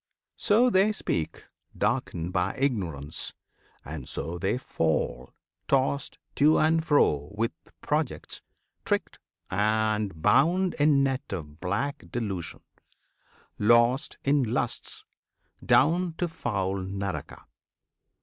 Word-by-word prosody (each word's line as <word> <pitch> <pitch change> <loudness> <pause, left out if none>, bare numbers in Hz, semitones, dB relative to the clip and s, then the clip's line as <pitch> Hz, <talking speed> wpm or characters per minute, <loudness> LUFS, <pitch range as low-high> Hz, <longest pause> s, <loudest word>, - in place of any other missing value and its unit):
So 235 +4 +4
they 195 +2 +4
speak 80 - -3 0.3
Darkened 85 +2 -1
by 95 +5 0
ignorance; 90 - -1 0.5
and 75 -3 -7
so 85 +5 -4
they 95 +6 0
fall 75 - -1 0.4
Tossed 135 +1 +1 0.2
to 150 +2 +5
and 160 +1 +3
fro 75 - +2
with 115 +1 +1 0.3
projects, - - -2 0.4
tricked, - - -1 0.3
and 105 -2 +1
bound 175 - +3
In 145 -2 +5
net 135 0 -2
of 75 -5 -6
black 100 - -2
delusion, 100 -8 -4 1.0
lost 120 +5 +3
in 140 +1 +3
lusts 120 +1 -2 0.6
Down 170 +4 +3
to 175 +2 -1
foul 100 - -2
Naraka. 95 0 -5
110 Hz, 100 wpm, -27 LUFS, 90-145 Hz, 1.0 s, to